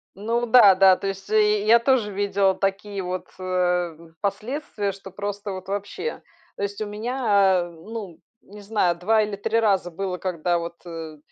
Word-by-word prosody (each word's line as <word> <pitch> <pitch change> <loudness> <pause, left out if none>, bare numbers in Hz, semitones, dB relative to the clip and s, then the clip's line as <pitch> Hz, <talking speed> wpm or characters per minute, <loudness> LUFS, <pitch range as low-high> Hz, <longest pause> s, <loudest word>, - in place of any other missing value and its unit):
Ну 230 +5 -1
да, 220 -5 +7
да. 190 0 +6
То 195 - -4
есть 195 +1 -5
и 210 -1 +3
я 230 +2 +7
тоже 235 -4 +2
видела 195 -1 +1
такие 195 0 -2
вот, 180 0 -4
э, 185 - -7
м, 175 -3 -1
последствия, 210 +1 -3
что 195 0 -11
просто 205 +1 -5
вот 185 0 -7
вообще. 205 - -4 0.3
То - - -5
есть 200 +1 -4
у - - -1
меня, 210 -4 +2
э, - - -10
ну, 180 +1 -9 0.2
не 205 +1 -13
знаю, 200 -4 +1
2 215 +5 +3
или 210 -1 -3
3 225 +3 0
раза 195 -5 +1
было, 185 +1 -3
когда 175 -1 -1
вот, 170 0 -6
э, 165 -2 -7
200 Hz, 180 wpm, -24 LUFS, 185-210 Hz, 0.3 s, да